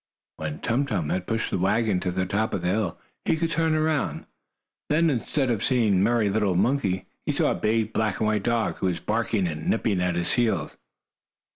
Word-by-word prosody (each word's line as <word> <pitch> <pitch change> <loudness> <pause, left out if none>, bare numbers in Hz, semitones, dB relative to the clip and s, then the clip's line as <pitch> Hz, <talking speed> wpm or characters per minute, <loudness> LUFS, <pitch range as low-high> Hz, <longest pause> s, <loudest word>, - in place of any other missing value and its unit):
When 75 -1 -5
Tum 130 +5 0
Tum 90 - -1
had 90 0 -2
pushed 115 0 -1
the - - 0
wagon 105 +1 +2
to 90 0 -2
the 95 +1 -1
top 105 +4 -1
of - - -4
the 90 - +1
hill, 100 -3 -1 0.3
he - - +2
could 165 0 -1
turn 160 -1 +1
around. 155 -2 0 0.6
Then, 160 +2 +3
instead 130 +1 0
of 110 -3 -1
seeing 120 -5 +2
the - - +3
merry 115 0 +2
little 100 -2 +1
monkey, 100 -2 +1 0.2
he - - 0
saw - - +2
a - - +2
big 110 0 0
black 110 -3 0
and - - +1
white 105 -1 +1
dog, 115 +1 0
who 95 - -1
was 90 -2 -1
barking 110 -2 0
and 75 -2 -4
nipping 105 -5 +1
at 90 -1 0
his 85 0 0
heels. 120 -2 0
110 Hz, 215 wpm, -25 LUFS, 95-120 Hz, 0.6 s, Then